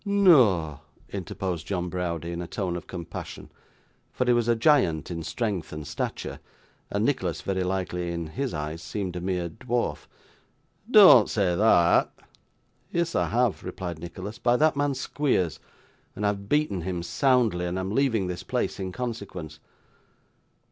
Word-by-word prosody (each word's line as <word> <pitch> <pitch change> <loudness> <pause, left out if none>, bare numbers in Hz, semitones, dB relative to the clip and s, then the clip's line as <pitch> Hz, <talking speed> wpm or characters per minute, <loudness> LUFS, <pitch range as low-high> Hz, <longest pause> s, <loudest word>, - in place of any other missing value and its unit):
'Noa!' 125 - +4 0.3
interposed 95 -3 -4
John 90 -3 -2
Browdie, 85 -2 -3
in 85 0 -4
a 85 - -5
tone 90 -3 -3
of 85 - -7
compassion; 85 -2 -8 0.6
for 125 - -1
he 125 - +4
was 120 -1 +1
a 120 - +4
giant 115 - +2
in 85 -1 -4
strength 95 +2 -3
and 75 -1 -6
stature, 75 +1 -4 0.5
and 100 +2 0
Nicholas, 95 - -1
very 95 -1 -1
likely, 90 -1 -2
in 85 -1 -3
his 130 - -3
eyes, 75 +2 -4
seemed 95 -1 -4
a 90 - -4
mere 90 -1 -1
dwarf; 85 - -3 0.8
'dean't 195 - +8
say 95 -5 +1
thot.' 90 -4 +4 0.8
'Yes, 170 -1 0
I - - +1
have,' 120 -2 +1
replied 85 -4 -5
Nicholas, 95 +7 -7
'by 120 0 +3
that 155 +1 +3
man 145 -1 0
Squeers, 130 - 0 0.6
and 105 - -3
I - - +4
have 100 0 -5
beaten 150 - +1
him 90 0 -3
soundly, 110 - +2
and 90 +1 -3
am 95 +1 -3
leaving 115 -6 +2
this 90 -1 -4
place - - -2
in 95 -1 -3
consequence. 100 -9 -6
95 Hz, 155 wpm, -26 LUFS, 85-120 Hz, 0.8 s, dean't